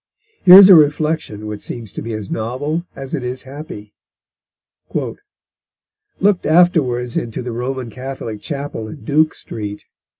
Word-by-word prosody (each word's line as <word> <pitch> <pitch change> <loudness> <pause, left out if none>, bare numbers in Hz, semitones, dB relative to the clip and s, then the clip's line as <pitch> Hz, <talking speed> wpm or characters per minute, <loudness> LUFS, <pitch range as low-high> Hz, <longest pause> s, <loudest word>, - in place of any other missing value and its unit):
Here 180 0 +11
is 195 -1 +10
a 195 - +9
reflection 150 - +2
which 105 -1 -6
seems 115 -5 -6
to - - -7
be 115 - -6
as 105 -2 -7
novel 145 +10 -3
as 135 +1 -8
it 140 -5 -2
is 125 +1 -4
happy: 135 -7 -10 2.3
"Looked 200 -1 +2
afterwards 150 -8 +2
into 115 +1 -4
the 120 - -5
Roman 125 0 -4
Catholic 125 -4 -7
Chapel 140 -7 -5
in 145 +6 -11
Duke 155 +1 +2
Street. 105 -2 -7
130 Hz, 140 wpm, -18 LUFS, 115-155 Hz, 2.3 s, Here